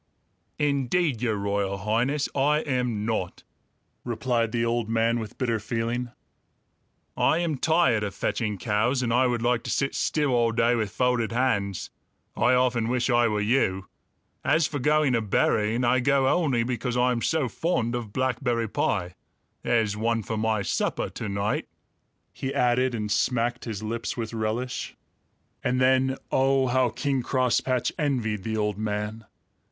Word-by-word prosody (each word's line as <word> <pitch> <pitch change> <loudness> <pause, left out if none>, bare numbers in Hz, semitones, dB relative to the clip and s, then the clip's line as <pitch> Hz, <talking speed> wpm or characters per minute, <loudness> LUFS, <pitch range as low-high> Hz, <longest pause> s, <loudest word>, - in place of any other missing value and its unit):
"Indeed, 140 -1 +1
Your 115 -3 +1
Royal 100 -1 -1
Highness, 120 +8 0
I 150 +2 +2
am 125 -7 -1
not!" 110 -6 -3 0.6
replied 115 -1 -1
the 115 0 0
old 115 -1 -1
man 115 +1 +1
with 110 -2 -7
bitter 115 -3 0
feeling. 115 +3 -2 1.1
"I - - +3
am 165 -5 -1
tired 160 -9 +3
of 100 - -4
fetching 105 -4 -2
cows, 115 +6 0
and 115 -1 0
I 125 +1 +4
would 120 -2 -1
like 120 -1 +2
to - - -4
sit 135 - 0
still 150 -3 0
all 120 -2 +2
day 115 +1 +3
with 110 -4 0
folded 125 0 0
hands. 105 -6 -1 0.4
I 130 - +3
often 125 -3 +2
wish 125 +1 0
I 120 0 +4
were 105 -1 0
you. 105 -4 +1 0.5
As 160 -1 +3
for 145 -1 -3
going 150 0 +2
a 115 - +2
berrying; 110 +2 +1
I 125 +1 +3
go 135 +1 +2
only 135 -7 +2
because 125 0 -2
I 125 +1 +3
am 120 -1 -1
so 160 -1 +1
fond 125 -2 -1
of 120 -4 -4
blackberry 125 -2 0
pie. 90 -4 -1 0.5
There's 110 -3 +1
one 115 +1 0
for 110 - -4
my 110 -1 0
supper 90 - -1
to 110 - -5
night," 100 +1 -1 0.7
he 135 - -4
added, 125 +1 +2
and 105 -2 -3
smacked 120 +2 0
his 110 -3 -5
lips 115 +2 -3
with 115 -1 -4
relish. 115 +3 -3 0.7
And 125 +1 +1
then, 130 +1 +3
oh, 135 0 +3
how 130 0 +2
King 135 +3 -1
Crosspatch 130 0 +1
envied 120 -9 0
the 110 +2 -3
old 105 -1 -1
man! 105 +1 -3
120 Hz, 160 wpm, -26 LUFS, 110-130 Hz, 1.1 s, I